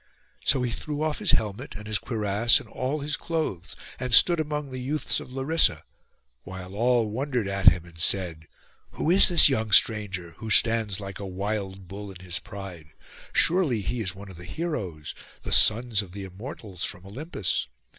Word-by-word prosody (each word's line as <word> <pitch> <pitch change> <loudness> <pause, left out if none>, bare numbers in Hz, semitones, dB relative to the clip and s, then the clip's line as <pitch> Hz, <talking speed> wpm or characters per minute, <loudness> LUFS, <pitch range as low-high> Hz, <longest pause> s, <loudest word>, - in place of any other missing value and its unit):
So 130 -3 +2
he 125 - -2
threw 150 +5 -4
off 155 -1 -2
his 210 -4 -1
helmet, 110 +5 -2
and 105 - -9
his 105 0 -1
cuirass, 110 0 +2
and - - -13
all 135 +4 -3
his 145 +1 -1
clothes, 155 - -4 0.2
and 125 -2 +2
stood 175 -2 +5
among 150 -2 -3
the 130 - -6
youths 145 +4 -1
of - - -11
Larissa, 135 - +2 0.6
while 95 +2 -9
all 115 0 +1
wondered 125 -2 -2
at 100 0 -2
him, 90 -1 +6
and 85 -1 -16
said, 85 -3 0 0.5
'Who 160 - -1
is 190 - +9
this 175 -2 +7
young 110 -6 -1
stranger, 105 -6 +3
who 110 - -7
stands 110 -2 +3
like 100 -1 -8
a 100 - -6
wild 95 0 -4
bull 100 +2 -8
in 95 -2 -11
his 90 -3 -4
pride? 90 -6 -10 0.4
Surely 165 - +2
he 120 +5 -3
is 95 -4 -1
one 100 0 -11
of 90 - -13
the 85 - -10
heroes, 95 - -5 0.3
the - - -6
sons 115 -1 +4
of 90 -3 -12
the 100 0 -7
Immortals, 95 - -8
from 90 - -3
Olympus. 105 - -3
105 Hz, 185 wpm, -25 LUFS, 95-130 Hz, 0.6 s, is